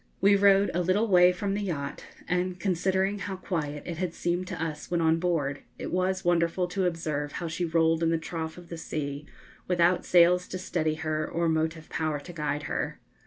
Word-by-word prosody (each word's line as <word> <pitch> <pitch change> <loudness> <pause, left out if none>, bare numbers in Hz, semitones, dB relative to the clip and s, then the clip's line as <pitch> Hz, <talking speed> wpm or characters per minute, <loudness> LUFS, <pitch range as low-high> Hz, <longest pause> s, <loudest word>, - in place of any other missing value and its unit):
We 200 +1 +5
rowed 200 0 +5
a 180 - +1
little 185 +6 +2
way 180 -2 +6
from 195 +2 -2
the 205 - -1
yacht, 150 -8 -4 0.2
and, 180 0 -1
considering 190 +2 0
how 195 0 -4
quiet 150 -6 -3
it 170 -2 -5
had 180 -3 -2
seemed 175 +1 -1
to - - -5
us 155 -2 -4
when 175 0 +1
on 165 0 +3
board, 155 -6 -1 0.2
it - - -5
was 185 +1 0
wonderful 175 +1 +2
to 185 0 0
observe 155 -4 -2
how 170 - -4
she 165 +2 -2
rolled 165 0 +2
in 165 - +3
the 165 - +2
trough 160 0 -5
of 175 -1 -12
the 170 - -6
sea, 145 -2 -4 0.4
without 175 0 +3
sails 180 +1 +5
to 185 - -5
steady 160 -4 -1
her 155 -1 -2
or 170 0 0
motive 160 0 -1
power 155 -2 -1
to 175 +5 -10
guide 150 -2 -2
her. - - -3
170 Hz, 205 wpm, -28 LUFS, 160-185 Hz, 0.4 s, way